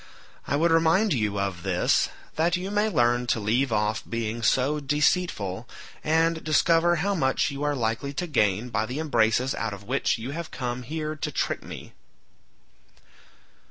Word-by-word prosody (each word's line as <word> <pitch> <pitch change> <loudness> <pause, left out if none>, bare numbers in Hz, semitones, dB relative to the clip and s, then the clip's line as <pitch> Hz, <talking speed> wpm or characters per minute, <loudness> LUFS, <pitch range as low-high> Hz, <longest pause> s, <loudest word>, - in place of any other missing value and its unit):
I 140 - 0
would 165 +3 +2
remind 165 +5 +3
you 105 -5 -1
of 95 -3 -2
this - - +2 0.3
that 170 +2 +2
you 185 +2 -5
may 210 +1 +2
learn 120 - +2
to 120 - +1
leave 120 +5 +1
off 105 0 0
being 115 0 -3
so 135 +5 +2
deceitful, 140 - 0 0.3
and 160 +1 +2
discover 165 +2 +3
how 195 +5 0
much 135 -4 +1
you 140 0 -6
are 145 0 0
likely 115 +3 -2
to 180 - -2
gain 105 - +1
by 110 -1 -1
the 125 - -5
embraces 130 -4 +1
out 110 -2 -3
of 100 - -13
which 130 +6 0
you 115 +4 -6
have 165 +2 -5
come 125 0 -4
here 155 +4 -4
to - - -3
trick - - -1
me." - - -10
135 Hz, 165 wpm, -26 LUFS, 115-160 Hz, 0.3 s, remind